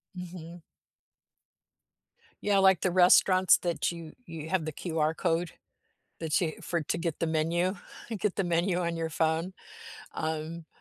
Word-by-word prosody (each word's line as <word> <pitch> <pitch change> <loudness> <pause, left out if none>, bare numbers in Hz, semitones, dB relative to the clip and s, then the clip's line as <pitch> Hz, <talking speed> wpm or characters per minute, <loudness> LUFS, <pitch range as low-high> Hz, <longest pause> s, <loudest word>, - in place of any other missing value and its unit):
Mhm. 175 -1 -9 1.8
Yeah, 205 -1 +3
like 190 -2 +5
the 185 - +1
restaurants 185 +1 +6
that 170 -2 -1
you 170 -2 -7
you 160 -1 -7
have 185 -3 0
the 155 - -4
QR 160 -1 -1
code, 170 -1 0 0.7
that 160 +2 0
you 160 -3 -1
for 170 -2 -2
to - - -2
get 170 -2 -3
the 165 - +1
menu 170 +4 0 0.4
get 205 -1 0
the 195 - 0
menu 175 +1 +1
on 170 -1 -1
your 165 -1 -2
phone. 160 +3 0 0.6
Um, 160 +1 -4
170 Hz, 145 wpm, -29 LUFS, 160-180 Hz, 1.8 s, restaurants